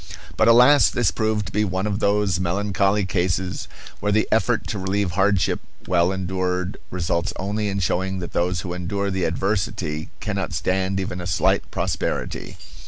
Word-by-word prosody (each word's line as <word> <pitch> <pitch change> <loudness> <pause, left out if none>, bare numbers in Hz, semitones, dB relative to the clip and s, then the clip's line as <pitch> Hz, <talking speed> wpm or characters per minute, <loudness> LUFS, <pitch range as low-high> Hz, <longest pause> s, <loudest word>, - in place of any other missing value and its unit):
But, 110 - +3
alas! 125 +5 +7
this 120 -6 +1
proved 110 -2 0
to 90 - -7
be 105 +3 +1
one 95 0 -1
of 105 -1 -1
those 100 -4 +2
melancholy 100 +2 +1
cases 90 -1 -1 0.3
where 105 - 0
the 110 +1 +2
effort 115 +1 +2
to 105 - -2
relieve 95 0 0
hardship 95 +1 +2 0.3
well 90 0 +3
endured 95 0 -2
results 85 0 -1
only 105 +2 -2
in 100 - -2
showing 95 0 0
that 85 -2 -6
those 90 0 0
who 90 0 -5
endure 100 +3 -2
the 95 -1 0
adversity 85 -3 -1
cannot 100 -3 -3
stand 95 +1 0
even 90 -1 -3
a 85 - -5
slight 80 -4 +1
prosperity. - - -3
95 Hz, 165 wpm, -23 LUFS, 90-105 Hz, 0.3 s, alas